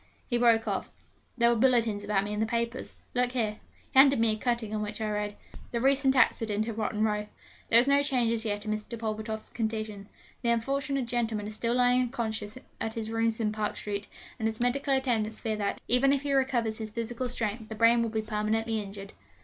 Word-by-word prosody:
he 240 - -2
broke 235 -2 +4
off: - - -2 0.5
'there 235 -1 +5
were 235 - +3
bulletins 230 -4 +2
about 205 -1 +1
me 205 +1 -4
in 210 - -3
the 220 - +2
papers. 235 +2 -3 0.2
Look 250 0 +1
here.' 215 -4 -1 0.4
He 265 - +6
handed 275 -2 +7
me 225 -1 +4
a - - 0
cutting 235 -1 -2
on 215 - -1
which 210 +1 -4
I 220 - -1
read: 210 -1 -2 0.3
'THE 235 - -2
RECENT 270 +1 +3
ACCIDENT 220 -4 +2
IN 230 - -2
ROTTEN 215 0 -1
ROW. 210 -1 0 0.4
There 230 - +7
is 240 - +3
no 280 +1 +5
change 255 -5 +2
as 230 -1 +1
yet 205 -1 -2
in 215 - -2
Mr. 215 +2 -4
Pulvertoft's 220 0 -4
condition. 215 -3 -4 0.3
The 235 - 0
unfortunate 275 +3 0
gentleman 230 -3 -1
is 215 - -4
still 230 +2 0
lying 250 0 +4
unconscious 225 -3 -3 0.2
at 225 0 -3
his 225 -1 -4
rooms 225 0 0
in 215 -2 0
Park 215 -1 -2
Street; 205 0 -4 0.3
and 220 - 0
his 220 0 -4
medical 250 +3 0
attendants 225 -5 0
fear 220 -2 -2
that, 200 -1 -2
even 270 +3 +4
if 280 0 0
he 285 -1 0
recovers 240 -5 +1
his 220 -1 -4
physical 235 +3 -4
strength, 220 -2 -3
the 220 - -5
brain 230 +2 +5
will 230 - 0
be 220 0 -2
permanently 220 +1 -1
injured.' 200 0 -9
225 Hz, 215 wpm, -29 LUFS, 215-245 Hz, 0.5 s, handed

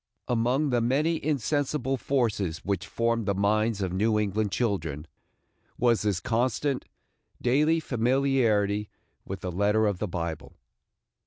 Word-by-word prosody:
Among 125 +5 +1
the 120 -1 +2
many 150 +8 +1
insensible 140 -1 0
forces 110 -11 -1
which 95 -2 -1
formed 115 -2 0
the 100 - +1
minds 105 +1 +1
of 90 -1 -2
New 105 +3 +2
England 105 0 0
children, 85 - -1 0.7
was 120 -2 +3
this 100 -4 0
constant, 125 +5 0 0.5
daily 150 +6 +3
familiarity 115 -6 +1 0.4
with 95 -1 -6
the 90 - -3
letter 105 +4 +2
of 100 -3 0
the 105 - -1
Bible. 85 -3 -5
110 Hz, 130 wpm, -27 LUFS, 100-130 Hz, 0.7 s, was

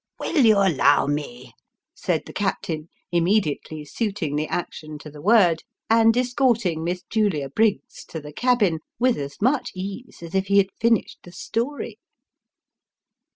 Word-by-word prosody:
" - - -45
Will 305 -6 +2
you 215 -2 +6
allow 190 -10 +4
me? 150 +12 -4 0.2
" - - -62
said - - -1
the - - -11
captain, 165 -5 -2 0.2
immediately 165 -4 0
suiting 195 -4 -2
the 155 +1 -1
action 155 -3 -5
to 150 0 -11
the 145 0 -11
word, 180 -4 +4 0.3
and 225 +1 +5
escorting 240 - +1
Miss 175 +2 -2
Julia 195 -11 0
Briggs 215 +7 0
to 160 - -7
the 150 0 -10
cabin, 215 - +2 0.2
with 250 +1 +3
as 140 0 -6
'much 255 +5 +1
ease 195 +2 -7
as 170 +1 -9
if 190 0 0
he 200 +1 +3
had 195 -1 +4
finished 230 -2 +1
the 175 - -13
story. 235 +10 -4
195 Hz, 155 wpm, -23 LUFS, 160-225 Hz, 0.3 s, you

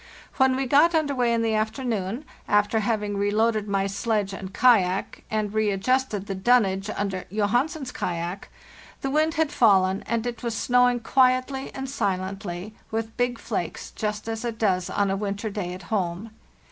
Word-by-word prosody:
When 265 -1 +4
we 270 +1 -1
got 295 +6 +4
under 305 -3 +1
way 245 -3 +1
in 230 -1 +1
the 225 -1 +1
afternoon—after 220 -1 -1
having 210 -2 -1
reloaded 210 +1 +1
my 195 -1 +1
sledge 200 0 -1
and 195 -1 -7
kayak, 195 -5 +2
and 215 -1 -1
readjusted 215 +1 +1
the 195 - -4
dunnage 195 -1 +2
under 195 -3 -3
Johansen's 250 - 0
kayak—the 175 +9 -6
wind 310 +2 +2
had 315 -2 +1
fallen, 195 -6 +4
and 230 0 -1
it 240 -1 -4
was 235 -2 -2
snow 250 0 +4
ing 245 -1 -2
quietly 255 +2 +2
and 270 0 -4
silently, 190 -4 -3 0.2
with 225 0 -3
big 245 -1 0
flakes, - - -4
just 210 0 -3
as 225 0 -3
it 235 -2 -3
does 185 -5 +1
on 200 -1 +1
a - - +1
winter 205 +2 -3
day 195 -3 -3
at 180 +1 -8
home. 190 +2 -2
215 Hz, 160 wpm, -25 LUFS, 195-245 Hz, 0.2 s, When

